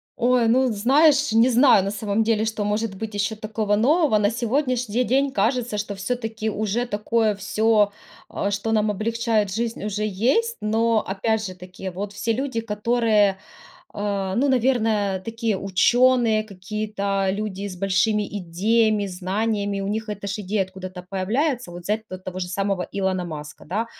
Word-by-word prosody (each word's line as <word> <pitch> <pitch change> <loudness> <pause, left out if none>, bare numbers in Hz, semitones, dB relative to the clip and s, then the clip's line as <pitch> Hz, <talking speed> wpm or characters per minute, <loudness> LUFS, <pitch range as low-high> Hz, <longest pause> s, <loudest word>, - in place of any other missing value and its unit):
Ой, 245 -1 +2
ну, 255 +1 +3
знаешь, 280 +6 +4
не 230 +3 +5
знаю, 245 -5 +5
на 195 - -2
самом 210 +1 0
деле, 220 -1 +1
что 220 -1 -2
может 210 0 -1
быть 220 +2 -6
еще 205 +2 -1
такого 215 -1 -1
нового. 280 +2 +3
На 205 0 +2
сегодняшний 245 -1 0
день, 270 +3 +1
кажется, 230 0 0
что, 205 0 -3
все-таки, 220 +2 -3
уже 215 +3 -1
такое 215 0 0
всё, 210 +1 +2 0.4
а, 200 - -2
что 205 +2 -2
нам 215 -1 +2
облегчает 215 -1 0
жизнь, 230 -1 -3
уже 210 0 -2
есть, 260 - +1
но, 220 +1 +2
опять 215 +3 -1
же-таки, 185 0 -7
вот 200 +3 -6
все 225 +2 -1
люди, 260 -2 -2
которые, 210 -2 +2 0.6
э, 200 -2 -2
ну, 275 +4 +2
наверное, 225 -6 +1
такие, 225 +2 -2
ученые, 230 +4 +3
какие-то, 200 0 -3
люди 200 -1 -4
с 190 - -7
большими 200 +3 +1 0.2
идеями, 210 +4 +1
знаниями, 200 +2 -2
у 195 - -3
них 215 +1 -3
эта 205 -1 -5
же 200 +2 -3
идея 200 +1 0
откуда-то 185 -1 -9
появляется. 240 - -1
Вот, 175 0 -9
взять 215 +3 -2
т 185 - -7
того 185 0 -7
же 180 - -3
самого 195 0 -1
Илона 190 -2 -1
Маска, 150 -3 -8
да. 210 +8 -2
215 Hz, 160 wpm, -23 LUFS, 195-230 Hz, 0.6 s, не